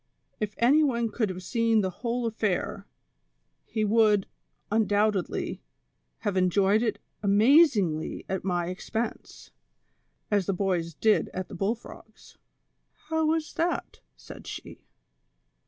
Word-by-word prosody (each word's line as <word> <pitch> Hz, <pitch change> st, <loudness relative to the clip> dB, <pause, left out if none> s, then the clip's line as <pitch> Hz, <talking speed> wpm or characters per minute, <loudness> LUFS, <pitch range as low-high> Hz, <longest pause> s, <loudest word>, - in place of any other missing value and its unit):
If 210 Hz, -1 st, -3 dB
any 280 Hz, +7 st, +5 dB
one 235 Hz, -5 st, 0 dB
could 220 Hz, -3 st, 0 dB
have 185 Hz, 0 st, -6 dB
seen 230 Hz, +1 st, +2 dB
the 190 Hz, -1 st, -1 dB
whole 240 Hz, 0 st, -1 dB
affair, 215 Hz, -5 st, -2 dB, 0.8 s
he 220 Hz, -1 st, -1 dB
would, 210 Hz, -2 st, +4 dB, 0.5 s
undoubtedly, 210 Hz, -2 st, 0 dB, 0.6 s
have 205 Hz, -3 st, -1 dB
enjoyed 190 Hz, +3 st, +3 dB
it 230 Hz, -2 st, 0 dB, 0.2 s
amazingly 205 Hz, -, +3 dB
at 190 Hz, -1 st, -3 dB
my 175 Hz, -2 st, -1 dB
ex 185 Hz, -, -9 dB
pense, 225 Hz, +1 st, -4 dB, 0.8 s
as 205 Hz, -3 st, +2 dB
the 195 Hz, -, +1 dB
boys 175 Hz, -4 st, -1 dB
did 215 Hz, +4 st, +2 dB
at 185 Hz, 0 st, -4 dB
tlie -, -, -8 dB
bull 205 Hz, +4 st, +1 dB
frogs." 220 Hz, -1 st, -15 dB, 0.3 s
" -, -, -49 dB, 0.2 s
How 320 Hz, -1 st, +1 dB
was 320 Hz, 0 st, 0 dB
that? 340 Hz, +1 st, -2 dB
" -, -, -49 dB
said -, -, -12 dB
she. -, -, -9 dB
215 Hz, 135 wpm, -27 LUFS, 190-235 Hz, 0.8 s, any